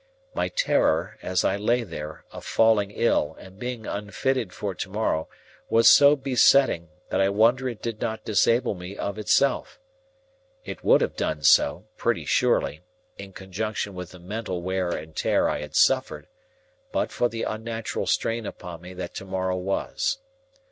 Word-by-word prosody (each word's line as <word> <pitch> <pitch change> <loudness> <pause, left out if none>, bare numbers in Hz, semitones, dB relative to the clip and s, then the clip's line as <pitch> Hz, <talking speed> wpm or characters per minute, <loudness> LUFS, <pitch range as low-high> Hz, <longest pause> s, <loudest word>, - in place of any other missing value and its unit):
My - - 0
terror, - - +1
as 90 0 0
I 95 - +1
lay 120 +4 +1
there, 80 -5 -8
of - - -9
falling 110 -3 +3
ill, 105 -8 +1
and 95 +1 -14
being 120 -2 -5
unfitted 105 +2 -2
for 100 +1 -4
to 90 - -5
morrow, 95 -6 -1 0.4
was 115 0 +5
so 145 +1 +8
besetting, 130 - +3 0.2
that - - +1
I 95 - +3
wonder 120 +6 +3
it 115 -3 -9
did 115 -2 -4
not 110 -2 -3
disable 115 +4 +2
me 90 +1 -8
of 100 +1 -4
itself. 135 +6 +1 0.9
It - - -7
would - - +5
have - - -1
done - - -2
so, - - +4
pretty - - 0
surely, - - +1 0.4
in 100 - -8
conjunction 100 +2 -4
with 90 -1 -7
the 90 - -13
mental 95 -1 -5
wear 95 0 -1
and 80 -2 -5
tear - - +2
I - - -1
had 75 0 -8
suffered, 130 0 +2 0.6
but - - -1
for 120 - +1
the 115 0 -4
unnatural 115 0 -4
strain 115 -1 0
upon 85 -2 -8
me 90 +1 -10
that 90 -1 -6
to 95 - -7
morrow 95 -1 -2
was. 95 - -1
105 Hz, 165 wpm, -25 LUFS, 95-115 Hz, 0.9 s, so